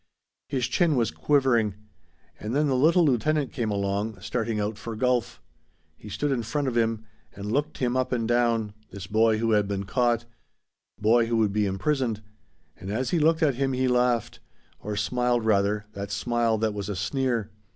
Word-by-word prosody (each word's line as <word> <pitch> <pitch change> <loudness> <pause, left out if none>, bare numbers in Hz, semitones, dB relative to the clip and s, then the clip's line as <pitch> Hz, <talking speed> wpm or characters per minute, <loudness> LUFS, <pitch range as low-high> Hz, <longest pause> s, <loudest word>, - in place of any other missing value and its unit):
His 130 -3 0
chin 170 -5 +2
was 115 -3 +1
quivering. 125 -8 +2 0.6
And 110 +4 -4
then 150 +1 +3
the 135 -3 +1
little 165 +6 +4
lieutenant 145 +2 +1
came 115 -3 -2
along, 100 +1 -2
starting 110 +2 -2
out 105 +1 -2
for 115 -1 -6
golf. 125 +1 0 0.6
He 105 - -12
stood 140 +9 -1
in 130 -3 0
front 140 +5 -2
of 125 - -2
him 115 -1 0 0.3
and 100 +1 -5
looked 145 +5 -1
him 125 -1 0
up 130 0 0
and 115 -3 0
down 115 -3 +1 0.2
this 95 -1 -8
boy 110 +2 +3
who 115 +1 0
had 105 -2 +3
been 100 -1 -2
caught. 120 +2 +1 0.7
Boy 115 +2 +3
who 115 0 0
would 105 -3 +2
be 105 -1 +1
imprisoned. 110 +3 -1 0.5
And 95 - -8
as 120 +5 -2
he 175 - +2
looked 160 +2 +3
at 145 -3 +3
him 135 -1 +1
he 130 0 +1
laughed; 125 -2 +1 0.4
or 105 0 -5
smiled 120 +2 0
rather, 105 0 +2
that 100 -1 -6
smile 115 +2 0
that 110 0 0
was 100 -1 -5
a 100 - -2
sneer. 115 +4 -1
115 Hz, 185 wpm, -26 LUFS, 105-130 Hz, 0.7 s, little